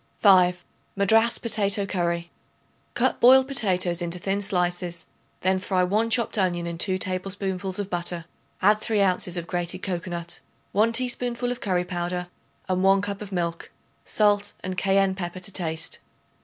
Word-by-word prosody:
5. 180 -3 +5 0.3
Madras 220 +4 +3
Potato 205 -3 +1
Curry. 170 -3 -2 0.6
Cut - - +1
boiled 260 +2 +7
potatoes 185 -9 +1
into 170 0 -2
thin 195 +3 -2
slices; 175 -2 -1 0.4
then 190 0 +2
fry 185 -1 0
1 215 +5 +1
chopped 230 -2 +1
onion 175 -2 0
in 170 -1 -5
2 185 0 +2
tablespoonfuls 185 0 -3
of 200 -1 -4
butter. 175 -1 -2 0.4
Add 210 +2 +5
3 215 -1 0
ounces 185 -2 +1
of 170 - -4
grated 175 +2 -3
cocoanut, 175 -2 -4 0.3
1 220 +3 +3
teaspoonful 245 0 0
of 245 - -5
curry 180 -3 0
powder 180 0 -3 0.4
and 185 -1 0
1 195 0 +4
cup 200 0 -4
of 205 -1 -8
milk, 170 -2 -3 0.3
salt 205 -1 +2
and 185 0 -4
cayenne 195 +1 +2
pepper 185 -1 -5
to 185 +2 -8
taste. 160 -4 -2
185 Hz, 155 wpm, -25 LUFS, 175-205 Hz, 0.6 s, boiled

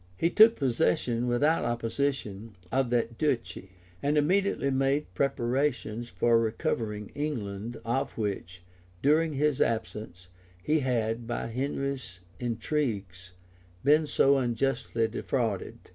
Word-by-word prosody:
{1101.} 170 - +2
He - - -14
took 225 +2 +8
possession, 120 -2 +1
without 145 +7 +2
opposition, 115 -3 -2 0.2
of 135 -1 +1
that 115 -1 0
duchy; 115 - -1 0.3
and 145 +2 +1
immediately 180 -1 +2
made 135 +2 0
preparations 120 -3 -1
for 115 0 +3
recovering 110 -1 -2
England, 115 -6 -4
of 120 +4 -1
which, 95 -4 -4 0.4
during 155 +3 +3
his 145 0 +1
absence, 105 -5 -2 0.4
he 155 +1 +2
had, 115 -3 -1
by 120 - -2
Henry's 130 -5 -3 0.2
intrigues, 110 -7 -3 0.5
been 150 +2 +4
so 140 -1 +4
unjustly 120 -2 0
defrauded. 115 -3 -2
120 Hz, 115 wpm, -28 LUFS, 110-140 Hz, 0.5 s, took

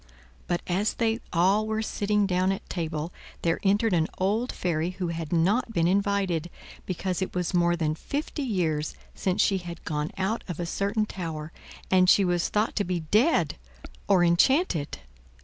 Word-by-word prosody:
But, 175 - -1
as 195 +4 0
they 225 -1 +1
all 195 +5 +3
were 220 0 -1
sitting 210 -1 +1
down 185 0 +1
at 195 - -5
table 165 -1 -3 0.3
there 165 -1 +1
entered 205 +2 +2
an 165 -2 +2
old 215 +7 0
fairy 170 -1 -1
who 180 -3 -2
had 165 -2 -4
not 200 +8 +2
been 170 -4 +2
invited, 190 -3 +1 0.4
because 185 0 -2
it 190 - -3
was 180 +1 -1
more 175 -1 +3
than 155 -2 0
fifty 290 - -4
years 170 - -1 0.2
since 185 -1 +1
she 195 -2 +2
had 175 -1 -9
gone 150 0 -2
out 195 +5 -1
of 175 -4 -5
a 175 - -1
certain 200 +4 0
tower, 160 -6 -5 0.4
and 185 -1 +5
she 195 - +6
was 175 -1 +1
thought 215 +1 0
to 205 - +2
be 180 -2 -2
dead 215 - +2 0.5
or 190 -3 +5
enchanted. 175 - +2
185 Hz, 170 wpm, -27 LUFS, 170-205 Hz, 0.5 s, she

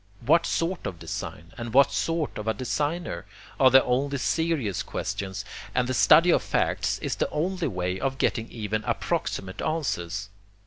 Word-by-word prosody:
What 165 +5 +4
sort 170 +1 -1
of 95 - -5
design? 85 0 -6
and 115 0 -5
what 140 -1 +6
sort 165 -7 -1
of 105 - -6
a 110 - +1
designer? 145 - -2 0.3
are 130 - +7
the 130 +1 +7
only 140 +3 0
serious 145 - 0
questions, 100 +1 -4 0.3
and 125 - +2
the 130 - -1
study 160 +7 +6
of - - +4
facts - - 0
is - - -1
the - - 0
only 180 +3 -1
way 90 0 -2
of 135 0 -1
getting 115 -4 0
even 110 -1 -3
approximate 95 +1 -2
answers. 100 - -2
130 Hz, 165 wpm, -26 LUFS, 100-155 Hz, 0.3 s, are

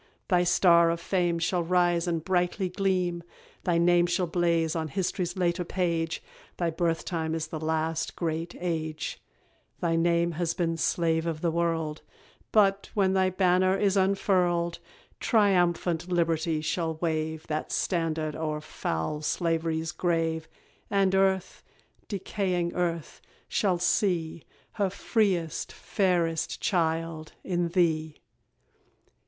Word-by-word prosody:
Thy 180 -3 +4
star 170 -1 +5
of 170 0 -1
fame 175 -1 0
Shall 175 +2 0
rise 175 0 +2
and 165 -2 -1
brightly 185 +1 0
gleam; 180 -2 0 0.4
thy 175 -3 +2
name 175 0 +4
Shall 175 +1 +1
blaze 170 -1 +1
on 160 -1 -1
hist'ry's 180 +3 -2
later 180 0 +1
page; 170 -2 -1 0.3
Thy 170 -2 0
birth 165 0 -1
time 160 -2 -2
is 160 -1 -2
the 155 0 -6
last 160 0 -1
great 165 0 -3
age; 160 -3 -3 0.6
Thy 165 -1 +1
name 170 +1 +2
has 170 0 -2
been, 170 -2 0
slave 165 0 +1
of 160 -2 -3
the 170 - +1
world; 165 -2 -1 0.5
But, 200 -2 +3
when 190 -2 +3
thy 190 -1 +3
banner 185 0 +3
is 200 -1 +2
unfurled, 180 -3 +1 0.4
Triumphant 180 -4 +2
Liberty 165 -2 +1
shall 160 +1 -1
wave 160 -1 -2
That 155 0 -3
standard 160 -3 -1
o'er 155 -1 -2
foul 150 - -3
slav'ry's 165 0 -1
grave, 165 -2 -1 0.4
And 195 -1 +2
earth 190 -1 +1 0.5
decaying 185 -3 -2
earth 170 -3 -2 0.3
shall 190 -4 +1
see 170 -3 0 0.3
Her 200 -3 0
freest, 185 -5 0
fairest 170 -4 0
child 165 -2 -1
in 175 -2 0
thee! 160 -3 +1
170 Hz, 125 wpm, -27 LUFS, 160-180 Hz, 0.6 s, star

